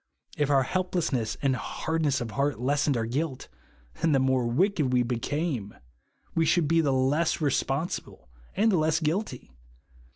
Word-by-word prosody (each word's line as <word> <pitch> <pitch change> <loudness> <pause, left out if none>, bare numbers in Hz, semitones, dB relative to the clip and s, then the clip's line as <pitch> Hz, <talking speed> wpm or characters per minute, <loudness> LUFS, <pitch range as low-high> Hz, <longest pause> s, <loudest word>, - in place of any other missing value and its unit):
If 145 -1 0
our 135 -2 +4
helplessness 165 -8 -1
and 135 -2 +2
hardness 155 0 -1
of 115 -2 -4
heart 140 -3 -1
lessened 140 +1 +1
our 115 - -1
guilt, 135 +3 -3 0.5
then 160 -1 +3
the 135 - +4
more 130 -2 +1
wicked 150 - +1
we 125 -1 +3
became, 125 - -2 0.6
we 165 - +2
should 160 0 +2
be 165 +2 +3
the 145 -3 +1
less 135 +5 +1
re 150 -3 +1
sponsible 135 - -3 0.3
and 220 +3 +3
the 185 - +3
less 155 0 +2
guilty. 155 - -2
145 Hz, 160 wpm, -27 LUFS, 130-160 Hz, 0.6 s, our